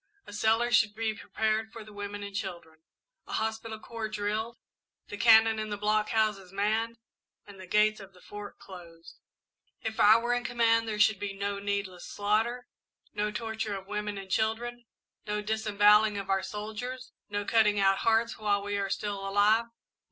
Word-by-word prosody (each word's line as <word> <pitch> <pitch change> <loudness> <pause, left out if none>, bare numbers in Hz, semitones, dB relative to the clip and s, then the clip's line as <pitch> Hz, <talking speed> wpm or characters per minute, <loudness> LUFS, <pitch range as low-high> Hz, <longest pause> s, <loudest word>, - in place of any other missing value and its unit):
A - - -11
cellar 225 +3 +2
should 220 -3 +3
be 220 0 -1
prepared 220 0 -2
for 225 - -9
the 215 0 -14
women 205 0 -6
and 200 -1 -8
children, 170 -5 -6 0.5
a - - -7
hospital 220 0 -3
corps 225 -1 -5
drilled, 215 +2 -3 0.5
the - - -5
cannon 220 0 +6
in 215 0 -3
the 205 - -3
blockhouses 210 -2 0
manned, 220 +4 0 0.5
and 200 -2 -13
the 185 - -10
gates 215 +2 +3
of 195 -1 -11
the 185 - -19
Fort 205 +2 -9
closed. 170 -3 -13 0.7
"If 220 0 -4
I 215 +2 +8
were 240 +1 0
in 245 0 -1
command 230 -1 +2
there 210 -1 -3
should 215 -2 +4
be 205 -1 -4
no 200 0 -3
needless 200 -3 -3
slaughter, 220 +4 0 0.5
no 210 0 -1
torture 220 -1 -3
of 190 -1 -7
women 210 0 -4
and 195 -1 -8
children, 235 +2 -1 0.4
no 210 0 -1
disembowelling 210 0 +4
of 195 -1 -3
our 195 0 +2
soldiers, 220 +6 -6 0.2
no 205 0 -2
cutting 210 -2 +3
our 195 0 +4
hearts 225 +3 +2
out - - -19
while 205 -1 +1
we 205 0 -2
are 195 -1 -2
still 200 -1 -3
alive. 210 +3 +4
210 Hz, 175 wpm, -29 LUFS, 200-220 Hz, 0.7 s, I